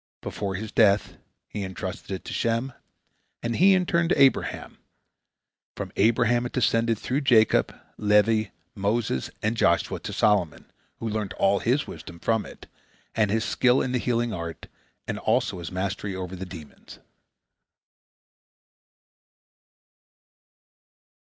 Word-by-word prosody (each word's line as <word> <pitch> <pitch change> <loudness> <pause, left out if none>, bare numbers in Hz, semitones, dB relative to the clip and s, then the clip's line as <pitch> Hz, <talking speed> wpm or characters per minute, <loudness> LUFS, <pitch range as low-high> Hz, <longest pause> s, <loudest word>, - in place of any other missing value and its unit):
Before 95 -1 -4
his 110 +3 -5
death, 105 -2 +3 0.3
he 105 - -5
entrusted 95 -1 -6
it 95 -1 -5
to - - -6
Shem, 115 +3 -1 0.7
and 115 0 -1
he 190 +2 +6
in 185 -1 +1
turn 170 -1 +1
to - - +2
Abraham. 135 -1 +2 1.0
From - - -5
Abraham 120 +3 +3
it - - -14
descended 115 -1 +2
through 130 +7 -2
Jacob, 120 -6 +3 0.2
Levi, 105 +1 +3 0.3
Moses, 105 - -1
and 105 +2 +1
Joshua 85 -6 +1
to - - -6
Solomon, 105 -7 +1 0.3
who 115 - -5
learnt 105 -2 -3
all 100 0 +2
his 130 +8 +1
wisdom 85 - -10
from 110 +4 0
it, - - -13 0.5
and 105 -2 +2
his 110 +2 0
skill 125 +1 +3
in 125 - -1
the 125 - 0
healing 120 -1 0
art, 85 -3 -6 0.4
and - - -3
also 110 -4 0
his 85 -2 -6
mastery 95 +1 -3
over 95 0 -5
the 95 +1 -7
demons. 80 -5 -12
110 Hz, 130 wpm, -25 LUFS, 95-120 Hz, 1.0 s, he